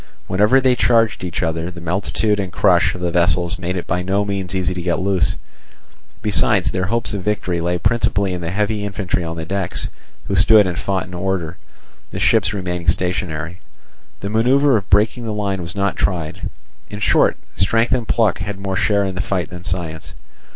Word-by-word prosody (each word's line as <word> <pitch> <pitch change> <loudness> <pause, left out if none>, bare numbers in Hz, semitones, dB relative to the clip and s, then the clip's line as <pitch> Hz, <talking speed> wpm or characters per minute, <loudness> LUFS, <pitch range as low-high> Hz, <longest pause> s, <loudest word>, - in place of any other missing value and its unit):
Whenever 105 +8 +4
they 130 -1 +3
charged 115 -4 +2
each 90 -2 -3
other, 80 +1 -1
the 90 -1 -9
multitude 100 +4 0
and 95 -2 -3
crush - - +3
of 90 - -8
the 90 -1 0
vessels 90 0 +2
made 90 +1 -3
it 90 - -3
by 90 +1 -1
no 100 +3 0
means 95 -2 -3
easy 95 -1 0
to 90 - -5
get 85 0 0
loose; 95 -1 +1 0.9
besides, 105 -2 +2
their 95 0 -1
hopes 115 +2 -1
of 100 - -3
victory 90 -4 -1
lay 90 +1 0
principally 100 -2 +1
in 90 - -4
the 85 - -3
heavy 105 +2 -1
infantry 100 -3 -2
on 85 0 -5
the 80 - -4
decks, 95 +1 -2 0.4
who 100 - 0
stood 105 +3 +6
and 90 -1 -2
fought 95 -1 -1
in 90 - -12
order, 90 -2 -2 0.5
the - - -7
ships 90 - +3
remaining 90 -4 -4
stationary. 85 0 -1 0.6
The 100 - -3
manoeuvre 130 +5 +4
of 100 -4 -2
breaking 110 +5 +3
the 110 - -3
line 100 -3 -2
was 85 +2 -7
not 100 0 0
tried; 85 -5 -2 0.4
in 105 +1 -7
short, 105 - +3 0.2
strength 115 +5 +2
and 120 -3 +1
pluck 110 -5 +2
had 100 -1 -4
more 95 -1 -3
share 100 +1 +2
in 95 -1 -2
the 90 - -2
fight 90 -4 -2
than 90 -1 -8
science. 85 -3 -5
95 Hz, 195 wpm, -19 LUFS, 90-105 Hz, 0.9 s, stood